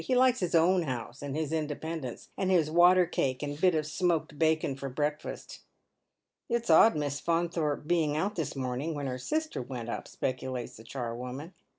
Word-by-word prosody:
He 255 Hz, -, +1 dB
likes 255 Hz, 0 st, +4 dB
his 180 Hz, -2 st, 0 dB
own 175 Hz, +3 st, +5 dB
house 130 Hz, -3 st, -5 dB
and 140 Hz, -1 st, -4 dB
his 155 Hz, 0 st, -2 dB
independence, 155 Hz, -3 st, -4 dB
and 190 Hz, -, -1 dB
his 165 Hz, -5 st, +3 dB
water 180 Hz, +2 st, +6 dB
cake 135 Hz, -5 st, -1 dB
and 145 Hz, +1 st, -4 dB
bit 185 Hz, -3 st, +4 dB
of 155 Hz, -1 st, 0 dB
smoked 160 Hz, -2 st, -1 dB
bacon 160 Hz, -3 st, +2 dB
for 135 Hz, 0 st, -5 dB
breakfast." 150 Hz, +3 st, -3 dB, 0.5 s
" -, -, -57 dB
It's 235 Hz, 0 st, +1 dB
odd 225 Hz, -, +7 dB
Miss 145 Hz, -2 st, -2 dB
Faunthorpe 165 Hz, -3 st, 0 dB
being 155 Hz, -3 st, +1 dB
out 195 Hz, +6 st, 0 dB
this 165 Hz, -7 st, -3 dB
morning, 135 Hz, +4 st, -2 dB
when 145 Hz, -1 st, -3 dB
her 130 Hz, -1 st, -3 dB
sister 310 Hz, -, -2 dB
went 120 Hz, -2 st, -6 dB
up," -, -, -4 dB
speculates 130 Hz, -1 st, -4 dB
the 110 Hz, -, -12 dB
charwoman. 125 Hz, +6 st, -5 dB
155 Hz, 185 wpm, -30 LUFS, 135-175 Hz, 0.5 s, odd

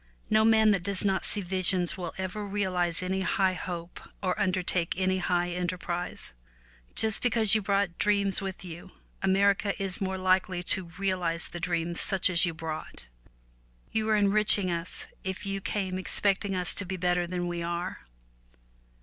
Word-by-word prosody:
No 215 Hz, 0 st, +5 dB
man 220 Hz, -1 st, +5 dB
that 195 Hz, -3 st, +1 dB
does 200 Hz, +1 st, -1 dB
not 190 Hz, -1 st, +1 dB
see 205 Hz, -, -1 dB
visions 185 Hz, -1 st, +1 dB
will 175 Hz, -3 st, -5 dB
ever 190 Hz, +2 st, -4 dB
realize 185 Hz, -4 st, 0 dB
any 190 Hz, +1 st, -1 dB
high 190 Hz, 0 st, +1 dB
hope 175 Hz, -1 st, -6 dB, 0.2 s
or 185 Hz, -1 st, 0 dB
undertake 180 Hz, -3 st, +1 dB
any 185 Hz, 0 st, +1 dB
high 175 Hz, -1 st, 0 dB
enter 180 Hz, +1 st, -2 dB
prise. 175 Hz, -, -5 dB, 0.6 s
Just 220 Hz, -2 st, +2 dB
because 225 Hz, -4 st, +5 dB
you 215 Hz, -, +4 dB
brought 195 Hz, -3 st, 0 dB
dreams 200 Hz, -2 st, +2 dB
with 190 Hz, -1 st, -6 dB
you, 175 Hz, +1 st, -9 dB, 0.3 s
America 200 Hz, +1 st, +2 dB
is 195 Hz, +1 st, -3 dB
more 190 Hz, 0 st, -1 dB
likely 185 Hz, -1 st, +1 dB
to 190 Hz, +1 st, +2 dB
realize 180 Hz, -4 st, 0 dB
the 175 Hz, -, -7 dB
dreams 170 Hz, -1 st, -1 dB
such 190 Hz, -1 st, +3 dB
as 175 Hz, +1 st, +5 dB
you 170 Hz, -, -2 dB
brought. 160 Hz, -, -7 dB, 0.8 s
You 220 Hz, 0 st, -1 dB
are 215 Hz, -, +4 dB
enriching 205 Hz, -2 st, +3 dB
us 170 Hz, +1 st, -4 dB, 0.2 s
if 190 Hz, +2 st, -4 dB
you 195 Hz, 0 st, -3 dB
came 190 Hz, -2 st, -2 dB
expecting 195 Hz, +1 st, 0 dB
us 180 Hz, -1 st, +1 dB
to 200 Hz, -, -3 dB
be 190 Hz, 0 st, -3 dB
better 180 Hz, -1 st, +1 dB
than 175 Hz, 0 st, -3 dB
we 175 Hz, -1 st, -3 dB
are. 170 Hz, +2 st, -3 dB
185 Hz, 165 wpm, -28 LUFS, 175-200 Hz, 0.8 s, No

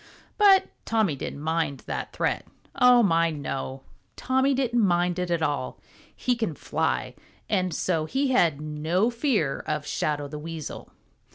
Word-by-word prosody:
But 395 Hz, -2 st, +7 dB, 0.2 s
Tommy 220 Hz, -9 st, +1 dB
didn't 140 Hz, -, -6 dB
mind 160 Hz, -3 st, -1 dB
that -, -, -4 dB
threat. -, -, -1 dB, 0.3 s
Oh, 250 Hz, -2 st, +6 dB
my, 165 Hz, -3 st, +3 dB
no! 135 Hz, -3 st, -5 dB, 0.3 s
Tommy 265 Hz, +1 st, +1 dB
didn't 245 Hz, -3 st, +1 dB
mind 175 Hz, -1 st, +2 dB
it 180 Hz, -1 st, -2 dB
at 170 Hz, -2 st, 0 dB
all. 145 Hz, -4 st, -2 dB, 0.4 s
He 250 Hz, -, 0 dB
can 220 Hz, -10 st, -2 dB
fly, 65 Hz, -, -1 dB, 0.3 s
and 185 Hz, -4 st, 0 dB
so 160 Hz, -1 st, 0 dB
he 265 Hz, -, 0 dB
had 170 Hz, -, +3 dB
no 155 Hz, +8 st, 0 dB
fear 230 Hz, -, 0 dB
of 150 Hz, -1 st, -2 dB
Shadow 150 Hz, -1 st, -1 dB
the 150 Hz, +1 st, -7 dB
Weasel. 160 Hz, -1 st, -7 dB
170 Hz, 150 wpm, -26 LUFS, 150-235 Hz, 0.4 s, But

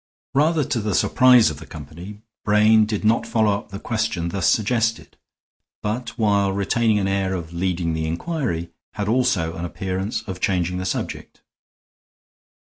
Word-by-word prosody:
Rather 150 Hz, +2 st, +3 dB
to 125 Hz, -, -1 dB
the 105 Hz, -3 st, -1 dB
surprise 125 Hz, +2 st, +5 dB
of 70 Hz, -, -8 dB
the 80 Hz, -, -10 dB
company, 85 Hz, +8 st, -10 dB, 0.2 s
Brain 105 Hz, +1 st, +4 dB
did 105 Hz, -1 st, -3 dB
not 115 Hz, +1 st, +2 dB
follow 110 Hz, -3 st, +2 dB
up 100 Hz, -, -7 dB
the 100 Hz, -, -6 dB
question 110 Hz, -6 st, -2 dB
thus 100 Hz, +1 st, 0 dB
suggested; 115 Hz, +1 st, 0 dB, 0.7 s
but, 115 Hz, +4 st, -3 dB
while 100 Hz, -3 st, +2 dB
retaining 105 Hz, +3 st, +1 dB
an 95 Hz, -1 st, 0 dB
air 95 Hz, -1 st, 0 dB
of 85 Hz, -2 st, -6 dB
leading 85 Hz, -1 st, -1 dB
the 80 Hz, 0 st, -2 dB
inquiry, 85 Hz, -, -3 dB, 0.2 s
had 105 Hz, -1 st, -3 dB
also 110 Hz, -9 st, +1 dB
an 85 Hz, -, -5 dB
appearance 95 Hz, +4 st, -3 dB
of 95 Hz, -2 st, -7 dB
changing 90 Hz, -1 st, 0 dB
the 95 Hz, -, -4 dB
subject. 95 Hz, -, -5 dB
100 Hz, 155 wpm, -22 LUFS, 90-115 Hz, 0.7 s, surprise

